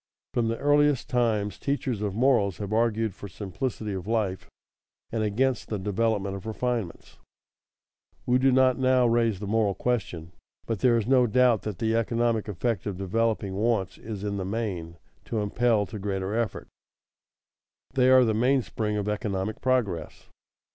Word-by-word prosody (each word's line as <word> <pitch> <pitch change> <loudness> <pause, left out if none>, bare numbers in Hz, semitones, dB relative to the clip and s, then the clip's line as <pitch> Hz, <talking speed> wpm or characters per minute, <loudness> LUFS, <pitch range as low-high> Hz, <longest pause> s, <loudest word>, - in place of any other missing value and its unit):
_ - - -67
From 120 -2 +1
the 115 0 -1
earliest 145 -2 +2
times 110 -5 0
teachers 135 -6 -2
of 100 -2 -2
morals 115 -7 +2
have 105 0 -4
argued 115 -2 +1
for 100 - -9
simplicity 105 +3 -4
of 95 0 -5
life 105 -5 -1 0.6
and 115 - -1
against 120 +4 0
the 105 - -3
development 100 0 -1
of 100 +3 -8
refinements. 115 -4 -3 1.1
We 125 +1 +3
do 135 +1 +4
not 130 0 +4
now 130 -1 +4
raise 115 -4 +2
the 105 - -5
moral 105 -1 +1
question, 90 -9 -2 0.3
but 115 -4 -2
there 120 +1 +4
is 110 - -1
no 125 0 +4
doubt 125 -1 +3
that 105 -4 -5
the 110 +2 0
economic 115 -1 0
effect 105 +1 -2
of 100 -3 -3
developing 100 +1 -1
wants 100 -2 0
is 105 -3 -7
in 100 -1 -2
the 95 - -2
main 95 -5 -4 0.3
to 115 - -3
impel 105 +1 +1
to 105 +1 -8
greater 95 0 -2
effort. 115 -2 -2 1.3
They 130 -1 +4
are 130 -1 +7
the 110 - +1
mainspring 115 -3 0
of 105 0 -2
economic 105 -1 -2
progress. 105 - -1
110 Hz, 160 wpm, -26 LUFS, 100-120 Hz, 1.3 s, are